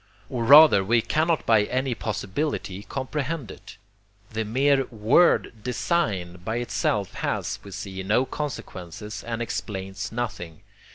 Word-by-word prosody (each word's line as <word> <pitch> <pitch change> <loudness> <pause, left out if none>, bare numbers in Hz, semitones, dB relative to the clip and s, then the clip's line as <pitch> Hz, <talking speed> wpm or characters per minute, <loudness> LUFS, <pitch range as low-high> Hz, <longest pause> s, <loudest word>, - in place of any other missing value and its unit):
Or 120 -3 -2
rather 145 -6 +8
we 115 +3 +2
cannot 160 +1 +1
by 110 -2 +4
any 130 +2 -1
possibility 105 -2 -3
comprehend 135 +1 -4
it. - - -13 0.5
The 110 0 -2
mere 135 +4 +2
word 115 +11 +3
'design' 105 - -1
by 110 +4 -2
itself 110 -4 -1
has, - - -2
we 100 - -10
see, 95 -1 -6
no 110 +7 +2
consequences 105 - -6
and 115 0 -3
explains 95 -3 -5
nothing. 105 -9 -5
115 Hz, 125 wpm, -25 LUFS, 100-135 Hz, 0.5 s, rather